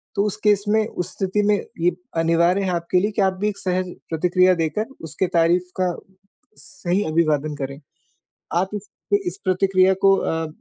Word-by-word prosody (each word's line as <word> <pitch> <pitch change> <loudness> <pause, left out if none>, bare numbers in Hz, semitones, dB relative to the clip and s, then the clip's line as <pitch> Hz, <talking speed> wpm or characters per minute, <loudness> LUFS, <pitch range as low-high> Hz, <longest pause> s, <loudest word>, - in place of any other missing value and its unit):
तो 200 - +2
उस 210 - -1
केस 205 -2 +3
में 215 0 +3
उस 180 -5 -4
स्थिति 195 +2 0
में 210 - +4 0.3
ये 175 +1 +4 0.3
अनिवार्य 170 +3 +3
है 190 - -1
आपके 170 +2 +1
लिए 210 +3 0
कि 205 - -1
आप 190 -1 +3
भी 210 - +2
एक 200 - -6
सहज 185 -1 -2 0.2
प्रतिक्रिया 180 +3 +3
देकर 165 +6 -1 0.2
उसके 160 +4 -2
तारीफ 175 +2 +2
का 180 -2 +1 0.6
सही 185 +4 -2
अभिवादन 155 -3 +1
करें। 140 0 -5 0.7
आप 180 +3 +1
इस 210 0 -7 0.4
इस 360 - -3
प्रतिक्रिया 185 0 +3
को 195 0 +7
अ, 160 -2 -1
185 Hz, 175 wpm, -22 LUFS, 165-195 Hz, 0.7 s, को